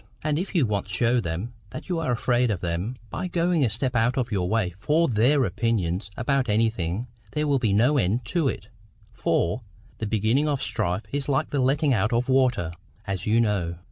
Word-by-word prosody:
And 155 0 0
if 190 +2 -5
you 160 -7 +4
once 100 -2 -2
show 120 +6 +2
them 95 +5 -4 0.2
that - - -8
you 175 -3 -1
are 155 -6 -1
afraid 120 +1 +1
of 100 -5 -2
them 90 +8 -2 0.2
by 185 - -3
going 175 -2 +1
a 120 - +3
step 125 +4 -1
out 115 +3 +2
of 120 -3 -1
your 90 -3 0
way 105 -5 0
for 160 +9 +2
THEIR 125 +5 +3
opinion 95 -3 0 0.2
about 130 0 0
anything, 105 -2 0 0.3
there 150 0 0
will 140 -2 +2
be 110 -4 +1
no 125 +8 +3
end 110 +3 0
to 170 -1 0
it; 105 -4 -4 0.4
for, 85 +9 0 0.4
the 110 - -2
beginning 110 +8 +1
of 145 -2 0
strife 90 0 -1
is 140 0 -2
like 135 - 0
the 145 - 0
letting 140 +2 +2
out 110 +1 +1
of 120 +3 0
water, 130 -10 +2 0.3
as 100 -1 -3
you 110 +2 +4
know. 100 -7 0
120 Hz, 205 wpm, -25 LUFS, 100-135 Hz, 0.4 s, you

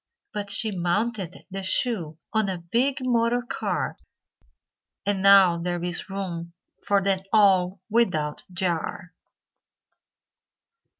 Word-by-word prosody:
But 205 -1 -4
she 215 +2 +2
mounted 185 +1 -2
the 195 +1 -4
shoe 185 -5 +1 0.2
On 220 -2 +1
a 185 - -2
big 250 +10 -1
motor 240 0 +1
car, 245 - -3 1.1
And 200 -1 0
now 195 -3 +6
there 175 0 -3
is 175 +2 -1
room 175 -3 -5 0.3
For 200 -1 +3
them 195 -1 +1
all 190 -4 +4
without 185 -10 0
jar. 175 -1 -2
195 Hz, 110 wpm, -25 LUFS, 175-220 Hz, 1.1 s, now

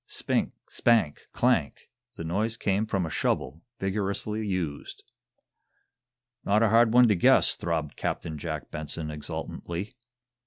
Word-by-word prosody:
Spink! - - -1
spank! 115 -11 +1
clank! - - +1 0.3
The - - -6
noise 105 +7 -1
came 100 +2 0
from 95 -4 0
a 80 - -5
shovel, 70 +6 -1 0.2
vigorously 100 +2 -2
used. 85 -7 -4 1.4
"Not 105 +3 +3
a 115 - +4
hard 115 +1 +5
one 125 +1 +7
to 105 - +4
guess," 85 - +4
throbbed 80 -4 -2
Captain 80 -2 -3
Jack 75 -2 -5
Benson, 75 +1 -5
exultantly. 85 +6 -5
95 Hz, 125 wpm, -27 LUFS, 80-110 Hz, 1.4 s, one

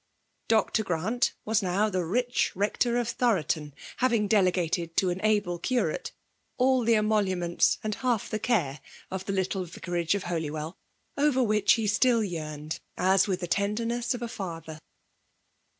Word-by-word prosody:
Dr. 220 0 +2
Grant 205 +8 0
was 220 0 +2
now 195 +3 +1
the 185 -4 -1
rich 245 +8 0
rector 215 +5 +1
of 240 -2 0
Thoroton, 165 - 0 0.3
having 230 -5 +2
delegated 180 -4 +1
to 185 -2 +3
an 180 +2 -4
able 205 -5 +1
curate 255 - -1 0.5
all 260 0 +3
the 230 0 +4
emoluments 195 -5 +2
and 215 -1 -1
half 240 -2 -1
the 215 - -3
care 170 - 0 0.3
of 190 0 -4
the - - -2
little 190 0 -1
vicarage 175 0 -2
of 200 - -3
Holywell, 160 -1 -3 0.4
over 280 -3 +3
which 210 -2 +4
he 225 -2 0
still 230 +2 +3
yearned, 155 -4 -5 0.2
as 190 +1 +3
with 185 -2 -1
the 175 - -3
tenderness 230 +6 0
of 240 - -6
a - - -2
father. 165 -7 -6
200 Hz, 150 wpm, -28 LUFS, 175-230 Hz, 0.5 s, the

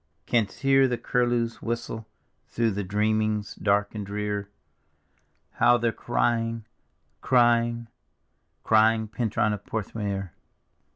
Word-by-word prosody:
Canst 115 -1 0
hear 135 -1 +4
the 125 -1 -1
curlews' 120 -2 0
whistle 115 -1 -4 0.4
through 115 -1 0
thy 100 +1 -2
dreamings 105 +1 0
dark 105 0 0
and 105 -2 -4
drear, 105 0 -3 1.0
How 120 - +4
they're 115 -1 0
crying, 115 -1 -1 0.6
crying, 120 -1 +2 0.8
crying, 110 0 +3
Pentruan 110 -2 0
of 105 -1 -6
Porth 110 -1 -5
meor? 100 -4 -3
110 Hz, 110 wpm, -26 LUFS, 105-120 Hz, 1.0 s, hear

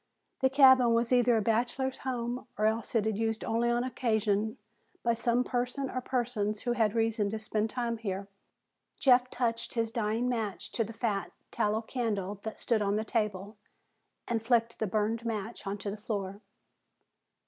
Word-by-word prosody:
The 265 - +3
cabin 260 -3 +6
was 235 +2 +1
either 245 -1 +4
a 215 - +1
bachelor's 245 +4 0
home 245 -1 -3
or 215 - +1
else 220 +2 0
it 220 -2 +3
was 220 -1 -1
used 225 -1 -1
only 235 +1 +1
on 240 0 +1
occasion 220 -4 0 0.5
by 235 - +3
some 235 +1 +1
person 250 +2 -2
or 255 - -2
persons 230 -5 -1
who 245 - -1
had 225 -3 +1
reason 225 -2 +1
to 220 - -3
spend 215 0 -1
time 235 -1 -2
here. 195 -2 -4 0.7
Jeff 250 -2 +5
touched 235 -1 -2
his 225 -1 0
dying 230 +1 0
match 220 -7 -2
to 230 - +1
the 220 - -7
fat 210 -5 -2 0.2
tallow 215 +2 0
candle 210 -5 -2
that 220 +1 -6
stood 225 -3 +1
on 200 0 +1
the 215 +1 -1
table 210 -2 -2 0.7
and 225 -2 -1
flicked 230 -1 +2
the 220 - 0
burned 215 +3 0
match 220 -1 -4
onto 200 +1 -3
the 210 - -6
floor. 200 -2 -4
225 Hz, 170 wpm, -30 LUFS, 215-240 Hz, 0.7 s, cabin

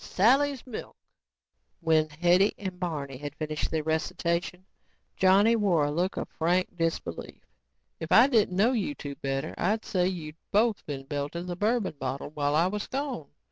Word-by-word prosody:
When 160 -2 +2
Hetty 175 +6 +3
and 185 -3 -6
Barney 145 -7 -4
had 145 +1 -7
finished 155 -1 -3
their 160 -1 -1
recitation, 170 +3 -1 0.5
Johnny 200 +5 +5
wore 185 -9 +2
a 145 - -1
look 175 +5 -1
of - - -3
frank 180 +3 +1
disbelief. 165 -1 -3 0.5
"If - - -6
I - - +8
didn't 220 -9 +2
know 220 +6 +4
you 260 +4 -1
two 145 - -6
better, 135 +2 -3
I'd 215 +5 0
say 180 -2 +1
you 165 -5 -4 0.2
both 215 +1 +2
been 140 -2 -4
belting 145 +5 -4
the 180 -1 -4
bourbon 210 -4 0
bottle 135 +2 -4
while 145 -1 0
I 165 +3 +4
was 205 +3 -2
gone. 270 - -4
175 Hz, 155 wpm, -28 LUFS, 150-195 Hz, 0.5 s, I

